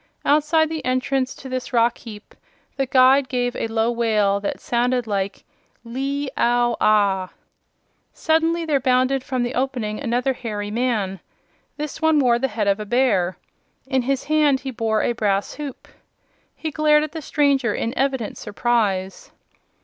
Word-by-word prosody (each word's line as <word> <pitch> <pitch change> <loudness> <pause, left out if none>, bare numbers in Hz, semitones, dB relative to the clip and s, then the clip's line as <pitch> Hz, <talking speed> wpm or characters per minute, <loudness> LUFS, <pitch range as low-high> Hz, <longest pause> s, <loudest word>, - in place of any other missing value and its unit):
Outside 305 +2 +3
the 320 -1 -4
entrance 255 +1 -1
to 270 - -10
this 255 -1 -4
rock 235 0 +3
heap 215 -2 -11 0.4
the 270 -1 -1
guide 260 +1 +5
gave 245 -1 -1
a - - -2
low 225 +1 0
wail 215 -4 +1
that 200 - -4
sounded 245 0 0
like 200 -2 -3 0.4
"Lee 275 +4 -3
ow 240 0 +2
ah!" 200 -3 +3 0.8
Suddenly 325 +1 +1
there 295 -3 +1
bounded 255 0 +2
from 255 -2 -2
the 240 +1 -3
opening 245 -5 -2
another 250 0 0
hairy 210 -4 -5
man. 215 -5 -1 0.6
This 300 +1 -5
one 320 -1 +3
wore 245 -4 +3
the 265 - +1
head 215 -4 -2
of 200 +1 +2
a - - -3
bear. 200 -7 +1 0.5
In 265 -1 0
his 270 +2 -1
hand 295 -3 +2
he 265 - -5
bore 225 -3 0
a - - +1
brass 205 -4 -1
hoop. 290 -4 -8 0.7
He 315 - -5
glared 300 0 +3
at 305 - -4
the 320 - -6
stranger 275 -6 +1
in 230 - -2
evident 265 -5 -1
surprise. 205 -4 -1
250 Hz, 155 wpm, -22 LUFS, 220-275 Hz, 0.8 s, guide